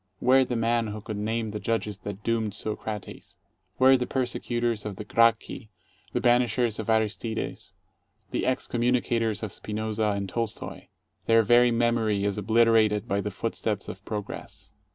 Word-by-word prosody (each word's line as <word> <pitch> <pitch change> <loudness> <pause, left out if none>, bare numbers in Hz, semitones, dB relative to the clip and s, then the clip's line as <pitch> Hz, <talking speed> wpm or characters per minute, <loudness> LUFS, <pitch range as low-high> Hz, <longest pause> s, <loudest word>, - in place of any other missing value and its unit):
Where 130 +5 +5
the 125 -1 -3
man 115 0 +1
who 105 0 -5
could 105 0 -6
name 110 +1 -2
the 105 - -4
judges 105 -3 -2
that 100 0 -7
doomed 110 -3 -1
Socrates? 105 -1 -6 0.4
Where 130 +1 +7
the 125 -1 -1
persecutors 120 -3 -1
of 105 -2 -5
the 105 - -6
Gracchi, 115 0 +1 0.4
the 125 - 0
banishers 120 -2 +2
of 110 - -4
Aristides, 110 0 -2 0.6
the - - -1
excom 125 -1 -1
municators 120 -2 +1
of 105 - -3
Spinoza 110 0 -2
and 100 -1 -3
Tolstoy? 115 +3 -4 0.4
Their 115 0 +5
very 120 +2 +5
memory 115 -3 +1
is 100 0 0
obliter 115 +2 +4
ated 105 +1 -1
by 100 -2 0
the 105 - -3
footsteps 105 0 -3
of 95 +2 -8
Progress. 105 -2 -7
110 Hz, 155 wpm, -27 LUFS, 105-120 Hz, 0.6 s, Where